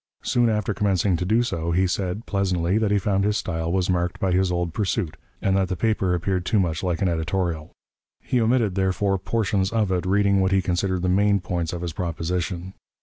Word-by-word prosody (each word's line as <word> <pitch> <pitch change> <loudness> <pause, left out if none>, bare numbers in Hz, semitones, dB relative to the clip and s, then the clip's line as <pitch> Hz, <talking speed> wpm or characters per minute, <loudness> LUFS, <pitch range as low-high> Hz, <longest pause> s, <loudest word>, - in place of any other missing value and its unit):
Soon 120 -1 +2
after 105 -1 0
commencing 100 -2 +1
to 90 - -2
do 110 +5 +3
so, 85 -9 -3
he 90 +3 +2
said 95 +4 -2
(pleasantly) 95 -1 0
that 110 -2 +1
he 105 - +3
found 100 0 +1
his 105 +1 +1
style 80 -1 -2
was 95 -1 +1
marked 90 -1 -1
by 95 - 0
his 95 0 +2
old 85 -2 -1
pursuit, 95 -5 -1 0.3
and 95 -1 +2
that 95 -1 +2
the 95 - -2
paper 95 -2 +1
appeared 90 +1 -1
too 105 +4 +1
much 85 -4 0
like 90 -1 -1
an - - +3
editorial. 85 -1 -2 0.5
He 125 - 0
omitted, 115 -3 +2
therefore, 95 +1 0
portions 100 -1 0
of 110 -4 +1
it, 90 0 -1
reading 100 0 +3
what 95 0 +1
he 95 - +4
considered 90 0 -1
the 90 - +1
main 100 +2 +3
points 85 -3 -3
of 85 0 -5
his 85 -2 -4
proposition. 85 +2 -3
95 Hz, 210 wpm, -24 LUFS, 90-100 Hz, 0.5 s, he